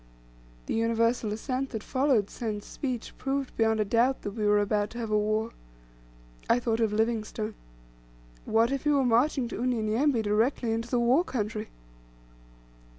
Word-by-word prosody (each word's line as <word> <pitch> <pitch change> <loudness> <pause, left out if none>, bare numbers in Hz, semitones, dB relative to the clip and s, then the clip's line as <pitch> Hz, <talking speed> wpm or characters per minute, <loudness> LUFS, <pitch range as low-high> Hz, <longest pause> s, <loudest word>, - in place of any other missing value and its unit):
The - - -3
universal 230 0 +1
assent 255 +5 -2
that 220 -4 -5
followed 260 -6 +1
Send's 215 -4 -4
speech 255 -5 -5
proved 270 0 -2
beyond 220 -1 +2
a 215 - +2
doubt 240 +5 +2
that 205 - -3
we 210 0 -1
were 210 0 +4
about 205 0 +1
to 235 - -10
have 225 -2 -4
a 210 - +3
war. 215 +2 0 1.0
I 240 - +4
thought 230 -2 -1
of 225 -2 +2
Livingstone. 220 0 -1 0.9
What 225 +3 +2
if 275 -1 -2
he - - +3
were 280 -3 +3
marching 245 +2 +2
to 230 - -5
Unyanyembe 240 +1 +1
directly 225 +3 +1
into 230 +1 -2
the 245 - +1
war 250 +8 +4
country? 215 - -3
230 Hz, 160 wpm, -28 LUFS, 215-250 Hz, 1.0 s, were